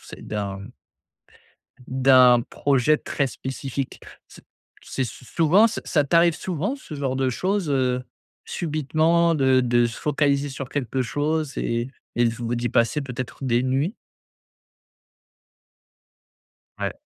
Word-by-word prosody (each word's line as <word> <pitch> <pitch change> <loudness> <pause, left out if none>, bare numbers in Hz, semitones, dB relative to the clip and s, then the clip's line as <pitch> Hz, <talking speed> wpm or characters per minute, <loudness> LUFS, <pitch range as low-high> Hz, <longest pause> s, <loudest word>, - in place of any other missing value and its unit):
c - - -11
d'un 100 -2 -4 1.3
d'un 130 -2 +5
projet 140 +2 +2
très 140 -2 -2
spécifique. 130 +1 -5 0.3
C - - -15 0.4
c'est - - -4
s 120 - -3
souvent 170 - +3
Ça 230 - -5
ça 145 -3 +2
t'arrives 170 +3 +4
souvent 185 - -3
ce 260 - -11
genre 135 -2 -2
de 130 -1 +1
choses, 185 - -1
heu, 125 -2 +1 0.4
subitement 160 +2 +1
de 130 -3 +4
de 120 -1 +3
se 115 - -8
focaliser 145 -1 +1
sur 130 -1 -6
quelque 135 -2 -2
chose 150 +3 -2
et 120 +2 -1 0.3
et 120 0 +3
ou 120 0 -2
d'y 120 0 -1
passez 115 +6 +1
peut-être 130 0 -6
des 120 -1 +2
nuits? 135 - 0 2.8
Ouais. - - -2
135 Hz, 125 wpm, -23 LUFS, 125-155 Hz, 2.8 s, d'un